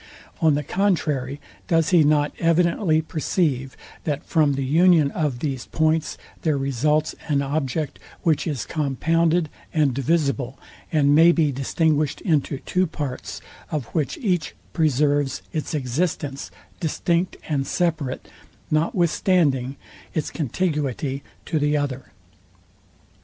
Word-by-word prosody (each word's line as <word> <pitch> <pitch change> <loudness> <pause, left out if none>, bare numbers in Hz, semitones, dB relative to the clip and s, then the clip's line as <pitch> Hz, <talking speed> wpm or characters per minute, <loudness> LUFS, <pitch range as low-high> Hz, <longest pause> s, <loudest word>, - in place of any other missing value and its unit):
On 155 -3 +4
the 150 - -1
contrary, 150 -9 0 0.3
does 165 -2 +2
he 175 -4 +6
not 145 0 +3
evidently 165 0 +2
perceive, 150 -5 -1 0.3
that 145 -2 -2
from 155 -4 +3
the 135 0 -2
union 160 0 +4
of 145 -7 -2
these 135 -5 -3
points 160 -1 +1 0.2
there 155 -3 +1
results 140 +3 +1
an 140 -2 +1
object, 145 +1 -2 0.2
which 160 -1 +2
is 145 -7 -2
compounded 165 +3 +1 0.2
and 150 -5 +2
divisible, 140 -2 0 0.3
and 145 -3 +4
may 165 +3 +7
be 160 -4 +2
distinguished 150 +2 0
into 150 -6 +1
two 185 0 +1
parts, 145 -5 -5 0.3
of 150 -5 -2
which 150 -4 -1
each 180 - -1 0.2
preserves 145 -2 +1
its 155 0 -2
existence 140 +1 -2 0.3
distinct 170 +2 0
and 140 -3 -1
separate, 155 -7 -1 0.4
notwithstanding 155 -4 +2 0.4
its 155 - -1
contiguity 145 -3 -2 0.2
to 160 - 0
the 150 +1 +2
other? 135 -7 -3
150 Hz, 120 wpm, -23 LUFS, 140-165 Hz, 0.4 s, may